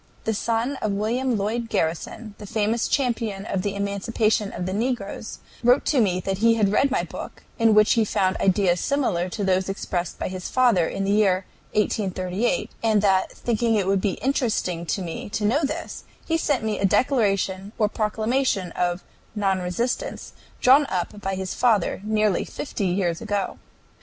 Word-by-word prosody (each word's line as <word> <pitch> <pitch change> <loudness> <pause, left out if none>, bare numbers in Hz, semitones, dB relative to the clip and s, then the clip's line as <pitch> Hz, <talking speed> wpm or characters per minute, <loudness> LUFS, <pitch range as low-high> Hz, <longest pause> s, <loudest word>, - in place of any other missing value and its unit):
The 225 - 0
son 230 +5 -1
of 215 -4 -1
William 235 +4 0
Lloyd 225 +3 -2
Garrison, 170 +7 -2
the 210 - -8
famous 220 +2 0
champion 230 -7 -1
of 195 -4 -1
the 200 +1 -2
emancipation 200 +1 0
of 180 - -4
the 185 - -2
negroes, 220 -1 -3 0.3
wrote 245 +3 +4
to 275 -5 +3
me 185 -4 +1
that 195 +1 -2
he 230 +1 +4
had 205 -3 +2
read 275 +6 +3
my 265 - 0
book, - - -8 0.2
in 225 -2 +5
which 215 0 +6
he 230 - +3
found 190 -2 +1
ideas 185 -2 +2
similar 215 -11 0
to 205 +2 -4
those 190 0 +1
expressed 180 -3 -3
by - - -3
his 185 -1 -5
father 235 -10 +3
in 195 - -3
the 195 - 0
year 195 -3 +3 0.3
1838, 195 0 0
and 215 -2 +2
that, 190 -2 +3
thinking 230 -1 0
it 200 -3 +1
would 195 0 +1
be 195 -2 0
interesting 215 -10 -1
to 190 - -1
me 170 +3 -6
to 210 +1 -2
know 270 +9 +2
this, 305 +4 -4 0.2
he 325 - 0
sent 290 -7 0
me 215 -1 -1
a 195 - +2
declaration 195 -4 +1
or 215 - +3
proclamation 215 -2 0
of 175 +1 -1 0.3
"non 195 -2 +1
resistance" 185 +8 -3 0.3
drawn 275 +3 +6
up 190 +1 -3
by 195 -1 -2
his 190 -1 -4
father 215 -7 +2
nearly 215 -2 +1
fifty 210 -8 -4
years 175 -2 0
ago. 205 -3 -2
210 Hz, 175 wpm, -24 LUFS, 190-230 Hz, 0.3 s, which